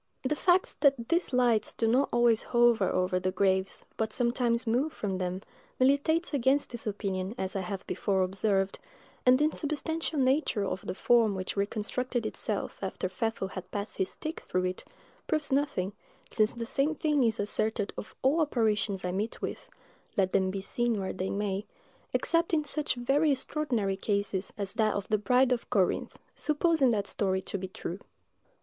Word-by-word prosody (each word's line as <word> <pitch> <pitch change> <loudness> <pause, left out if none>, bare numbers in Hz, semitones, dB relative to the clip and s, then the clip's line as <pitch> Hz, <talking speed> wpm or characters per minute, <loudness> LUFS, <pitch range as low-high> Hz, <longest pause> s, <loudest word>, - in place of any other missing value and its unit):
The 275 +3 0
fact 360 +4 +2
that 270 -5 +3
these 340 -1 +1
lights 245 -4 +2
do 230 - 0
not 255 +5 +3
always 240 -2 +4
hover 235 -5 +3
over 185 0 +1
the 185 0 0
graves, 190 0 +1
but 220 -1 -1
sometimes 235 0 +1
move 250 +7 +1
from 195 -3 -3
them, 185 +1 -3 0.4
militates 285 +6 +2
against 275 +1 +2
this 235 -2 -2
opinion, 195 0 -2
as 190 +1 -3
I 195 - 0
have 190 +1 -5
before 195 -2 0
observed; 195 +1 0 0.5
and 250 0 +8
the 295 - +2
insubstantial 310 +1 -2
nature 260 -5 +2
of 190 0 -4
the - - -3
form 230 -3 +3
which 185 0 -4
reconstructed 220 +4 -1
itself 215 -1 -3
after 190 -1 -2
Pfeffel 195 0 -2
had 185 -1 -7
passed 205 +1 -5
his 190 - 0
stick 315 +1 -5
through 185 0 -1
it 185 0 -3 0.4
proves 300 -2 0
nothing, 265 -9 0 0.3
since 215 +1 +1
the 235 -1 -4
same 275 +5 0
thing 300 -3 +2
is 225 -2 +1
asserted 210 +1 0
of - - -8
all 285 +6 +3
apparitions 215 -8 0
I 180 - -1
meet 205 +5 -3
with, - - -5 0.5
let 190 -2 +2
them 190 -1 +2
be 195 +1 -3
seen 235 +2 -1
where 190 -1 -3
they 190 0 -3
may, 200 0 -2 0.4
except 335 0 +2
in 305 - +1
such 295 0 -2
very 280 +5 +2
extraordinary 250 -8 -1
cases 200 -1 -1
as 200 -2 -3
that 215 -2 +1
of 200 - -3
the 215 - +2
Bride 250 +4 +3
of 245 -2 -1
Corinth, 190 -3 +1 0.2
supposing 305 -2 +2
that 210 -4 +1
story 190 -2 0
to 200 - -4
be 190 - -4
true. 185 0 -6
220 Hz, 175 wpm, -29 LUFS, 195-265 Hz, 0.5 s, and